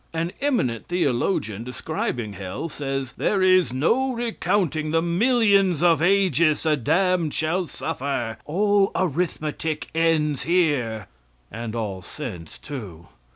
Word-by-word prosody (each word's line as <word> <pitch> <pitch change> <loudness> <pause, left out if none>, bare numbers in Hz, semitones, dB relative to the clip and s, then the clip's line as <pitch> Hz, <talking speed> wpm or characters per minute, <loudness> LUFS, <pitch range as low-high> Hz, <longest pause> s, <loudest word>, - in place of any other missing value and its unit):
An 165 +1 -1
eminent 185 - 0
theologian, 125 - 0
describing 125 -4 -3
hell, 95 - -5
says: 135 -3 -4
"There 195 -2 +1
is 185 -5 +4
no 235 - +1
recounting 200 - -1
the 165 +1 +2
millions 195 - +3
of 165 -2 +4
ages 175 -4 +3
the 155 -2 +3
damned 175 +4 +1
shall 170 +3 0
suffer. 125 -6 -3
All 200 +4 +2
arithmetic 160 -2 -2
ends 160 -3 +1
here" 145 - +1 0.5
and 115 +1 -5
all 100 -5 -3
sense, 95 - -8
too! 100 - -9
160 Hz, 115 wpm, -24 LUFS, 125-185 Hz, 0.5 s, is